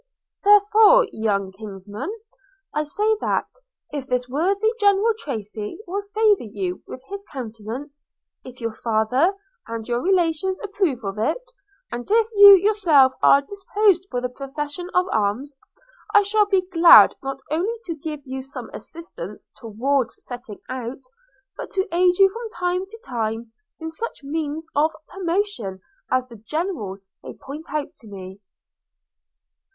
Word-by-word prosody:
– - - -63
'Therefore, 420 +4 +6
young 200 -3 -1
kinsman, 205 - -7 0.6
I 300 0 0
say 420 +8 +1
that, - - 0 0.5
if 280 -3 -5
this 250 -1 -1
worthy 390 - +1
General 410 +2 +4
Tracy 215 0 -5
will 390 +3 -3
favour 430 -3 +4
you 195 -5 -4
with 255 - -9
his 400 0 -6
countenance, 255 +3 -7 0.4
if 255 -1 -12
your 230 -2 -3
father 235 - +1 0.3
and 230 -1 -5
your 240 0 0
relations 370 +1 +1
approve 380 - -1
of 195 +1 -4
it, - - -2 0.4
and 240 0 -6
if 450 +1 +3
you 405 -1 +11
yourself 350 -10 +4
are 280 - +6
disposed 395 +1 +1
for 245 - -2
the 250 - -2
profession 295 +6 -5
of 360 0 +4
arms, 220 +7 -1 0.6
I 410 - +8
shall 415 +1 +2
be 385 -2 +2
glad 340 -2 +8
not 270 0 -4
only 365 +9 0
to 340 - -3
give 305 -1 -6
you 265 0 -5
some 270 +1 -8
assistance 335 +9 -8
towards 245 +3 -2
setting 245 -4 -8
out, 255 +1 -6 0.5
but - - -7
to 385 +2 0
aid 360 0 +4
you 390 - +7
from 455 +4 -7
time 360 -1 -2
to 450 +3 -12
time 225 -1 -3 0.3
in 320 0 -5
such 385 0 -6
means 310 +2 -3
of 310 +2 +2
promotion 350 - -2 0.3
as 255 0 +1
the 235 -2 -12
General 230 - -3 0.2
may - - -9
point 295 +4 -9
out 300 -1 -3
to 225 - -12
me.' 190 -1 -10
295 Hz, 145 wpm, -23 LUFS, 235-385 Hz, 0.6 s, you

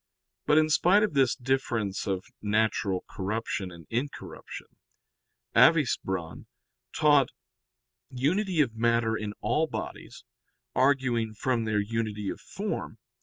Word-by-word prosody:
But 150 - +5
in 155 0 +4
spite 190 +7 +5
of 210 - 0
this 135 -3 +3
difference 120 -6 -1
of 95 -2 -2 0.2
natural 105 -3 0
corruption 100 -1 -3
and 85 -2 -12
incorruption, 130 +5 -5 0.9
Avicebron 95 - +2 0.4
taught 145 -4 +4 0.8
unity 165 +7 +1
of 125 -6 0
matter 115 0 +2
in 105 -1 -4
all 150 +9 +1
bodies, - - -7 0.5
arguing 130 -5 +1
from 120 0 0
their 110 -1 +1
unity 105 -1 -2
of - - -8
form. - - -5
115 Hz, 115 wpm, -28 LUFS, 105-140 Hz, 0.9 s, But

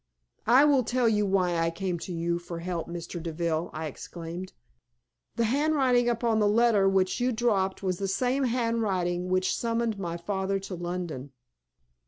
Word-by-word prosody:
"I 255 +5 +7
will 280 -4 +4
tell 245 +1 +1
you 210 -2 +2
why 185 -3 +1
I 165 0 +2
came 175 +1 -3
to 180 - -6
you 170 0 -1
for 175 -1 -7
help, 170 -1 -4
Mr. 170 0 -6
Deville," 165 0 -2
I 155 +1 -5
exclaimed. 170 +4 -7 0.8
"The 235 - +1
handwriting 260 -1 +2
upon 230 -1 +1
the 210 - +3
letter 210 -2 +4
which 190 +1 +1
you 250 +1 +1
dropped 205 -5 0
was 185 -2 -1
the 195 - -1
same 255 +7 +1
handwriting 210 -7 0
which 185 0 +1
summoned 230 -2 -1
my 170 -3 -3
father 190 +2 -1
to 195 0 -7
London." 175 -6 -5
190 Hz, 165 wpm, -28 LUFS, 175-230 Hz, 0.8 s, I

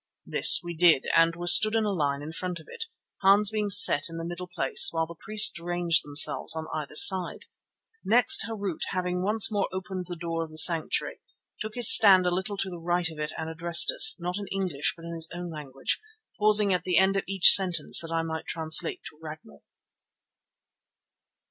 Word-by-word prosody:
This - - +3
we 175 0 -10
did, 165 -4 0
and 165 0 0
were 175 +1 -10
stood 215 +5 +6
in 225 - -2
a 210 - -4
line 145 -5 -5
in 155 - -10
front 180 0 -8
of 160 - -20
it, 455 - -9 0.4
Hans 200 +2 +1
being 210 -1 -5
set 195 -7 +5
in 165 - -11
the 165 - -9
middle 175 +1 -10
place, 390 - +3
while 165 - -4
the 170 - -14
priests 215 +2 +1
ranged 175 -1 -1
themselves 145 +2 +2
on 160 0 -8
either 150 -1 -9
side. 185 +2 +3 0.6
Next 245 +9 +1
Harût, 200 -6 -8
having 180 0 -5
once 210 +3 -1
more 205 -2 -4
opened 185 -1 -9
the 175 - -9
door 165 -1 -7
of 160 - -12
the 155 - -15
sanctuary, 165 +1 +1 0.4
took 215 0 -9
his 240 -3 +8
stand 190 -4 +4
a 180 - -2
little 190 +3 -6
to 195 - -5
the 175 - -11
right 175 0 -4
of 155 - -15
it 150 0 -7
and 160 - -8
addressed 165 +1 +2
us, 250 - +4
not 180 +3 -7
in 200 - -10
English 185 -8 -5
but 165 - -16
in 170 - -10
his 165 0 -5
own 175 -1 -10
language, 140 - -7 0.4
pausing 210 -1 +2
at 180 -1 -4
the 180 -2 -3
end 190 +2 0
of 195 - -4
each 195 -2 +5
sentence 185 -3 +3
that 165 -1 -9
I 165 0 -4
might 160 -1 -9
translate 160 -1 -2
to 155 - -29
Ragnall. 155 - -14
175 Hz, 205 wpm, -23 LUFS, 165-195 Hz, 0.6 s, his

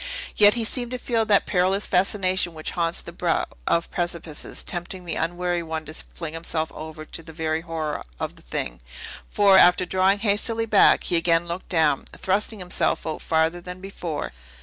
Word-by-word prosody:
Yet 210 +1 +6
he 235 - 0
seemed 240 +2 +2
to 250 - -3
feel 230 -3 0
that 200 -1 +4
perilous 190 +2 +2
fascination 185 -2 +1
which 155 - -3
haunts 170 -1 -1
the - - -8
brow - - 0 0.2
of 170 - +1
precipices, 170 -3 -2
tempting 180 +1 -5
the 170 - -2
unwary 175 +1 -1
one 160 -1 -5
to 155 - -9
fling 160 0 -7
himself 165 -1 -3
over 155 0 -8
for 165 - -7
the 165 0 -11
very 160 0 -2
horror 160 -3 -4 0.2
of - - -4
the - - -18
thing; - - -4 0.5
for, 200 -2 +6
after 180 +1 +5
drawing 190 +2 +2
hastily 225 +2 +1
back, 215 -3 +5
he 175 - +1
again 165 0 +2
looked 170 +2 -6
down, 155 -5 +2
thrusting 210 +3 0
himself 180 -2 0
out 160 -1 -4
farther 160 +2 +1
than 180 +1 -8
before. 180 -5 -5
175 Hz, 180 wpm, -24 LUFS, 160-195 Hz, 0.5 s, Yet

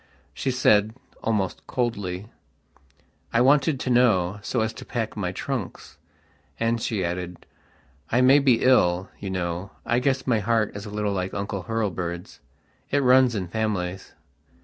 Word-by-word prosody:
She - - -2
said, 110 -4 +3 0.3
almost 105 -5 -2
coldly: 100 -6 -2 1.1
"I 115 - +2
wanted 140 +2 +4
to 125 - -1
know, 105 -6 +3
so 115 +3 -1
as 110 0 -1
to - - -9
pack 115 -2 -3
my 95 -4 -2
trunks." 120 0 -5 0.6
And 115 0 0
she 100 -6 -1
added: 90 0 -5 0.7
"I 120 - +3
may 135 +3 +7
be 130 -4 +3
ill, 90 -8 +3
you 100 - -5
know. 90 0 -3 0.2
I 120 - +2
guess 135 +1 0
my 120 -4 +2
heart 110 0 0
is 100 +1 -6
a - - -6
little 105 -1 -1
like 95 -1 -3
Uncle 100 -2 -4
Hurlbird's. 90 -6 -3 0.5
It 145 0 +1
runs 125 -1 +5
in 95 -3 -2
families." 95 -3 -3
105 Hz, 150 wpm, -25 LUFS, 95-120 Hz, 1.1 s, may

